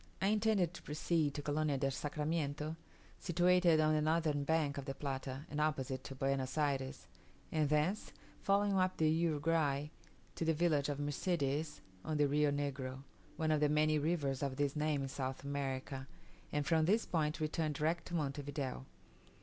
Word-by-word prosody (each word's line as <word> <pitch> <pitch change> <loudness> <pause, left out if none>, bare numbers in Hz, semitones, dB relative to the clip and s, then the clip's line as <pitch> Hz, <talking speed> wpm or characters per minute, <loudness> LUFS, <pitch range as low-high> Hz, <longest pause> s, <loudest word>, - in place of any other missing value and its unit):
I 195 - +2
intended 210 -5 +2
to - - -9
proceed 150 -1 0
to 145 - -4
Colonia 150 -1 0
del 135 0 0
Sacramiento, 150 +1 -2 0.4
situated 175 -1 +4
on 155 0 +4
the 155 - +2
northern 155 -2 +1
bank 145 -2 +1
of 135 - -6
the 135 - -4
Plata 135 0 -4
and 150 +1 -2
opposite 135 -4 -1
to 135 - -6
Buenos 135 +1 -1
Ayres, 135 -3 -1 0.5
and 155 -2 +1
thence, 155 +7 +1 0.3
following 200 0 +3
up 185 0 +1
the 160 - +3
Uruguay, 155 -2 +1 0.4
to - - -3
the 160 -1 +2
village 150 -4 +2
of 145 -1 -2
Mercedes 145 0 -1 0.2
on 155 -1 -1
the 145 -1 +4
Rio 150 +1 +3
Negro 135 -2 -3 0.3
(one 160 -1 +1
of 155 - +3
the 150 0 +3
many 155 0 +3
rivers 145 -4 0
of 140 -2 -1
this 140 +1 0
name 150 -2 0
in - - -2
South 130 0 -4
America), 135 -1 -3 0.4
and 145 -1 0
from 160 -2 +3
this 215 +6 +3
point 155 -3 0
to - - -4
return 155 0 0
direct 160 +4 -1
to 175 - -4
Monte 145 -3 -1
Video. 135 -2 -4
150 Hz, 175 wpm, -36 LUFS, 140-160 Hz, 0.5 s, situated